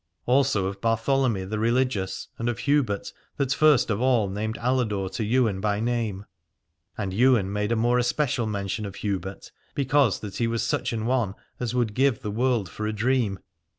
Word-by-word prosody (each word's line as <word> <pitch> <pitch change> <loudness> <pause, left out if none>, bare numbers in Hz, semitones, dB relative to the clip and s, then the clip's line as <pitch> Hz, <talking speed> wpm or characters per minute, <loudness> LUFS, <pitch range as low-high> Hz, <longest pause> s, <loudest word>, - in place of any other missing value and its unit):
Also 125 -6 +2
of 100 +1 -4
Bartholomy 115 -1 +1
the 105 +2 -3
religious 115 -4 0
and 115 +1 0
of 120 - -2
Hubert 135 -8 0 0.2
that 135 -2 +1
first 150 -6 +4
of 105 +2 -1
all 125 -5 +3
named 110 +3 -3
Aladore 110 -6 0
to 115 - -3
Ywain 110 -3 +1
by 105 0 0
name: 110 -4 -2 0.7
and 100 -3 -3
Ywain 115 -3 +3
made 105 +1 -1
a - - +3
more 120 +2 +2
especial 120 -1 0
mention 100 0 -3
of 100 - -9
Hubert, 95 -2 -4 0.2
because 140 -4 +2
that 105 -2 -6
he 115 - +1
was 115 0 -1
such - - -1
an 110 -2 -2
one 120 -5 0 0.2
as 125 -1 -2
would 120 -4 +1
give 130 -1 +1
the 105 - -3
world 120 -2 +1
for 105 +4 -5
a 110 - -2
dream. 115 -2 +1
115 Hz, 185 wpm, -25 LUFS, 105-125 Hz, 0.7 s, first